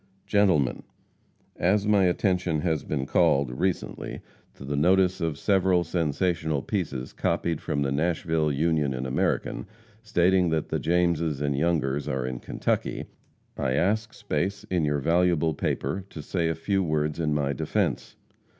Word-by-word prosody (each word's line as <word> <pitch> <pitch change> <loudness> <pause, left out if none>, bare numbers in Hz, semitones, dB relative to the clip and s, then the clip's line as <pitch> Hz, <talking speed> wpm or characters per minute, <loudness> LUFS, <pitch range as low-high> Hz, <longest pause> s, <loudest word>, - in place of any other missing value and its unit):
GENTLEMEN: 95 -11 +2 0.8
As 100 +4 +2
my 105 -2 +4
attention 90 -3 +1
has 80 -2 0
been 70 -3 -2
called, 70 -1 +2
recently, 90 +9 -3 0.3
to 70 - -10
the 70 +1 -2
notice 90 +4 +3
of 80 -3 -1
several 95 -2 +2
sensational 80 -2 -1
pieces 70 - -3
copied 85 -3 -1
from 70 - -1
the 70 - -1
Nashville 80 0 0
Union 75 -2 +1
and 65 +1 -3
American, 65 +7 -1 0.3
stating 95 -4 +2
that 80 -1 -1
the - - -1
Jameses 85 -3 +1
and 70 -1 0
Youngers 75 -3 0
are 65 -3 -1
in 65 -1 -4
Kentucky, - - -2 0.5
I - - -1
ask 110 +3 +1
space 100 +3 -2
in 85 -4 +2
your 75 0 +1
valuable 85 0 +2
paper 95 +5 -2
to 75 - -8
say 85 +1 -1
a 80 - -1
few 95 +4 0
words 75 -1 -1
in 75 -2 0
my 70 -1 0
defence. - - -1
80 Hz, 150 wpm, -26 LUFS, 75-90 Hz, 0.8 s, my